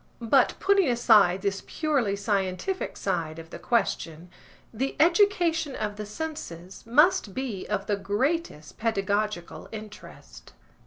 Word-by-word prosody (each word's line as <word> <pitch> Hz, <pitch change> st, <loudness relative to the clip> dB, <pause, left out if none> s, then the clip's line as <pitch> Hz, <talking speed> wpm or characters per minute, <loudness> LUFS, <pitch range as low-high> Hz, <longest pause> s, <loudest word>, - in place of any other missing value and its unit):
But 250 Hz, +3 st, +3 dB
putting 395 Hz, -5 st, +3 dB
aside 210 Hz, -6 st, +4 dB
this 195 Hz, -1 st, -1 dB
purely 275 Hz, -10 st, 0 dB
scientific 200 Hz, -, -2 dB
side 165 Hz, -5 st, -2 dB
of 165 Hz, 0 st, -11 dB
the -, -, -8 dB
question, 175 Hz, -7 st, -1 dB, 0.4 s
the 265 Hz, +5 st, -2 dB
education 335 Hz, -3 st, +3 dB
of 210 Hz, -1 st, -3 dB
the 210 Hz, -1 st, -6 dB
senses 205 Hz, -, -7 dB
must 265 Hz, -, +3 dB
be 250 Hz, -8 st, -4 dB
of 205 Hz, -2 st, -2 dB
the 205 Hz, -, 0 dB
greatest 205 Hz, -, -2 dB
pedagogical 205 Hz, -4 st, -2 dB
interest. 215 Hz, -1 st, -11 dB
215 Hz, 120 wpm, -26 LUFS, 195-290 Hz, 0.4 s, aside